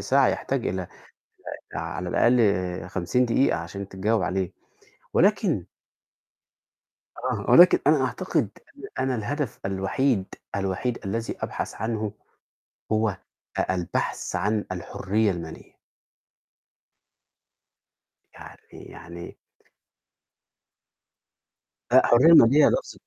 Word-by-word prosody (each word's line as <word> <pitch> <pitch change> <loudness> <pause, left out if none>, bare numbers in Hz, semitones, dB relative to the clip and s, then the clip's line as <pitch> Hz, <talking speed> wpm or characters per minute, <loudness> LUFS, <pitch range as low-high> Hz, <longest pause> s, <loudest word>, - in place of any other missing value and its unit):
ساعة، - - +3
يحتاج - - -2
إلى 95 +1 -2 0.7
آآ - - -10
على 90 -1 -5
الأقل 95 -7 +2
50 105 +9 0
دقيقة 125 +3 +2
عشان 95 +4 -7
تتجاوب 100 +2 0
عليه، 95 0 -2 0.6
ولكن - - +2 1.6
آه، - - -2
ولكن 180 +1 +8
أنا 145 -2 +4
أعتقد 145 - -1 0.5
أنا 130 0 0
أن 120 - -2
الهدف 145 +2 -3
الوحيد، 95 +3 0 0.3
الوحيد 100 +5 -2
الذي 115 +4 -3
أبحث - - -4
عنه 110 -2 -3 0.8
هو 110 -2 +1 0.4
أ 95 - 0
البحث 90 -2 -3
عن 105 0 0
الحرية 100 +4 -1
المالية. 85 -3 -8 2.6
يعني - - -12 0.2
يعني 85 +1 -11 2.5
لأ، - - +6
حرية 130 +8 +6
مالية 145 -1 +7
لفظ - - -2
105 Hz, 95 wpm, -25 LUFS, 95-125 Hz, 2.6 s, ولكن